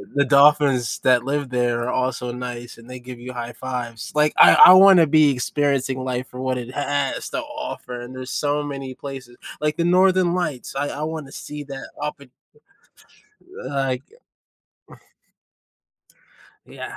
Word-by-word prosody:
the 140 Hz, 0 st, +3 dB
dolphins 140 Hz, -3 st, +3 dB
that 125 Hz, -2 st, +3 dB
live 140 Hz, 0 st, -2 dB
there 120 Hz, -1 st, -1 dB
are 125 Hz, -, -2 dB
also 125 Hz, -1 st, -2 dB
nice, 120 Hz, -1 st, -7 dB
and 115 Hz, +2 st, -16 dB
they 125 Hz, 0 st, -8 dB
give 125 Hz, 0 st, -11 dB
you 125 Hz, +1 st, -8 dB
high 120 Hz, -1 st, -6 dB
5s. 120 Hz, -3 st, -6 dB
Like, 150 Hz, 0 st, +2 dB
I -, -, +8 dB
I -, -, +10 dB
wanna 185 Hz, -3 st, +7 dB
be 150 Hz, -1 st, +4 dB
experiencing 135 Hz, 0 st, -1 dB
life 130 Hz, 0 st, -3 dB
for 125 Hz, -, -10 dB
what 130 Hz, -1 st, -1 dB
it 125 Hz, 0 st, -7 dB
has 145 Hz, -1 st, -2 dB
to -, -, -3 dB
offer, 295 Hz, -, -7 dB
and 120 Hz, +1 st, -10 dB
there's 130 Hz, 0 st, -7 dB
so 145 Hz, 0 st, -1 dB
many 135 Hz, -3 st, -7 dB
places, 130 Hz, -3 st, -9 dB, 0.2 s
like 150 Hz, +2 st, -1 dB
the 170 Hz, -, 0 dB
northern 185 Hz, 0 st, +3 dB
lights, 155 Hz, -8 st, -3 dB
I 145 Hz, +1 st, -2 dB
I 150 Hz, -, -5 dB
wanna 155 Hz, -4 st, -7 dB
see 150 Hz, 0 st, -8 dB
that 135 Hz, -1 st, -9 dB
oppo 150 Hz, -2 st, -6 dB, 1.4 s
like 135 Hz, -2 st, -2 dB, 2.6 s
Yeah. -, -, -9 dB
135 Hz, 155 wpm, -21 LUFS, 125-150 Hz, 2.6 s, I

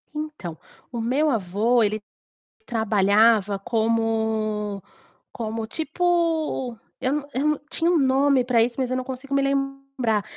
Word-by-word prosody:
Então, 300 Hz, -, -5 dB, 0.3 s
o 235 Hz, -, -3 dB
meu 270 Hz, +7 st, +2 dB
avô 225 Hz, +1 st, +2 dB
ele 215 Hz, 0 st, 0 dB, 0.6 s
trabalhava 210 Hz, -2 st, +3 dB
como 220 Hz, -2 st, 0 dB, 0.5 s
como 220 Hz, -1 st, -4 dB
tipo, 320 Hz, -4 st, 0 dB, 0.2 s
eu 260 Hz, +2 st, +1 dB
não 295 Hz, -1 st, -3 dB
eu 270 Hz, +4 st, 0 dB
não 300 Hz, -1 st, +1 dB
tinha 330 Hz, +1 st, 0 dB
um 345 Hz, -, +4 dB
nome 270 Hz, -1 st, +3 dB
para 245 Hz, -2 st, +3 dB
isso, 235 Hz, 0 st, -2 dB
mas 255 Hz, -1 st, -1 dB
eu 255 Hz, -, +1 dB
não 255 Hz, -, -2 dB
consigo 265 Hz, +1 st, -6 dB
me 275 Hz, -, +3 dB
lembrar, 275 Hz, -5 st, -1 dB
245 Hz, 140 wpm, -24 LUFS, 220-275 Hz, 0.6 s, um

